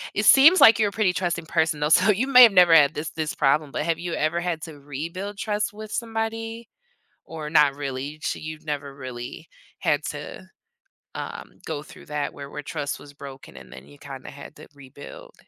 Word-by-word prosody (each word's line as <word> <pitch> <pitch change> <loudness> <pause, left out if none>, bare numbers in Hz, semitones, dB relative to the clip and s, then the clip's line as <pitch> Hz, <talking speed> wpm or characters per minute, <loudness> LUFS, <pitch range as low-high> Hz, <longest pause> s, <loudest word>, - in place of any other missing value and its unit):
it 205 - 0
seems 300 +10 +7
like 225 - +8
you're 210 -2 +2
a - - -13
pretty 210 -3 +1
trusting 175 -2 -2
person 160 -2 0
though, 150 - +1
so, 160 - +4
you 215 +6 0
may 250 -2 +7
have 230 - +8
never 180 -3 +6
had 150 -2 +6
this 155 +1 -4
this 155 -1 -4
problem, 145 +1 +1
but 150 - -3
have 165 -1 -1
you 175 -1 -5
ever 155 +3 0
had 175 -2 -3
to 155 -3 -9
rebuild 170 +9 -6
trust 210 -1 -2
with 215 0 -10
somebody? 225 0 -4 0.6
Or 155 -2 -7
not 150 -3 +4
really, 140 +1 -5
sh - - -2
you've 155 0 -8
never 145 -2 -4
really 125 -3 -8 0.3
had - - 0
to, - - -7 0.7
um, - - -7
go 150 -2 -4
through 160 - -15
that 150 -1 -3
where 140 0 -9
where 150 - -7
trust 145 -1 -4
was 145 0 -14
broken 140 -1 -11
and - - -14
then 65 +1 -12
you 145 - -17
kinda 135 -2 -10
had 145 +2 -12
to - - -13
rebuild? 145 - -13
155 Hz, 205 wpm, -24 LUFS, 145-205 Hz, 0.7 s, like